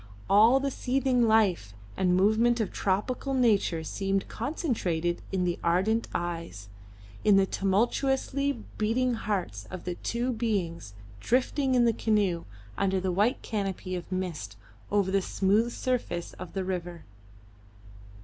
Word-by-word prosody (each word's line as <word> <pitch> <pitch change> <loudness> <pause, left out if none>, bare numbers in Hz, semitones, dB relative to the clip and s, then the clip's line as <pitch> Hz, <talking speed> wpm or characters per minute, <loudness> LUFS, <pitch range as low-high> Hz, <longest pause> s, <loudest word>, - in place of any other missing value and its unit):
All 225 +6 +6
the 275 0 -1
seething 255 -2 +1
life 190 - +2 0.2
and 180 -1 +2
movement 220 +5 +3
of 215 -5 -1
tropical 250 +8 -1
nature 205 -9 +2
seemed 195 +4 -1
concentrated 190 - -2
in 190 -2 0
the 175 -1 -1
ardent 190 +7 +1
eyes, 165 -12 -4 0.5
in 210 -2 +5
the 195 - +5
tumultuously 265 +7 0 0.2
beating 245 +4 +1
hearts 180 - -3
of 185 -2 -7
the 180 - -3
two 240 +7 -2
beings 180 - -2 0.2
drifting 260 - +1
in 245 -1 +4
the 230 - +3
canoe, 205 -6 +1 0.3
under 190 -1 +1
the 185 0 -1
white 205 +7 +1
canopy 195 -4 -3
of 180 +1 -7
mist, 175 - -4 0.3
over 200 -2 +1
the 195 0 +2
smooth 205 +5 +1
surface 235 -10 -2
of 185 -1 -9
the 195 - -2
river. 175 -2 -5
200 Hz, 135 wpm, -28 LUFS, 180-235 Hz, 0.5 s, All